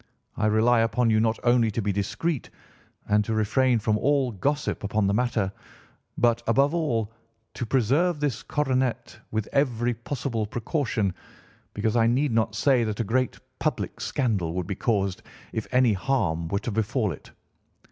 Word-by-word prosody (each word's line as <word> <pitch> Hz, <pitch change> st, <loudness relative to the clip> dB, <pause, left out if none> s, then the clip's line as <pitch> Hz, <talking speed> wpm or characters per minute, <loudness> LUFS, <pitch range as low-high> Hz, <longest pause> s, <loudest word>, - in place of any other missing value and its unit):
I 110 Hz, -, +1 dB
rely 115 Hz, +3 st, +4 dB
upon 115 Hz, +1 st, +2 dB
you 110 Hz, -, +4 dB
not 110 Hz, 0 st, +1 dB
only 120 Hz, -2 st, +4 dB
to 110 Hz, -, -3 dB
be 105 Hz, -, +1 dB
discreet 120 Hz, -, -2 dB, 0.6 s
and 105 Hz, 0 st, +3 dB
to 110 Hz, +1 st, -2 dB
refrain 120 Hz, +4 st, +2 dB
from 105 Hz, -1 st, 0 dB
all 140 Hz, -1 st, +2 dB
gossip 140 Hz, +8 st, -1 dB
upon 105 Hz, +1 st, 0 dB
the 100 Hz, -, +2 dB
matter 110 Hz, -4 st, 0 dB, 0.7 s
but, 120 Hz, -1 st, +3 dB
above 135 Hz, +6 st, +3 dB
all, 115 Hz, -10 st, -1 dB, 0.4 s
to 120 Hz, -, -4 dB
preserve 140 Hz, +8 st, +2 dB
this 145 Hz, -5 st, -1 dB
coronet 130 Hz, -6 st, -1 dB
with 110 Hz, -1 st, -2 dB
every 120 Hz, -4 st, +1 dB
possible 115 Hz, -2 st, -3 dB
precaution 115 Hz, -, -1 dB, 0.6 s
because 110 Hz, +2 st, 0 dB
I 115 Hz, -1 st, +4 dB
need 130 Hz, +4 st, +2 dB
not 110 Hz, -1 st, +1 dB
say 125 Hz, +2 st, +3 dB
that 110 Hz, -1 st, -3 dB
a -, -, +2 dB
great 125 Hz, +4 st, 0 dB, 0.2 s
public -, -, -2 dB
scandal 105 Hz, -, -1 dB
would 90 Hz, -1 st, -2 dB
be 100 Hz, -, -3 dB
caused 100 Hz, -2 st, -1 dB, 0.3 s
if 110 Hz, -, -3 dB
any 125 Hz, -3 st, +4 dB
harm 90 Hz, -7 st, 0 dB
were 100 Hz, -, -1 dB
to 120 Hz, +3 st, -3 dB
befall 110 Hz, 0 st, 0 dB
it. 75 Hz, -, -10 dB
115 Hz, 165 wpm, -26 LUFS, 105-130 Hz, 0.7 s, rely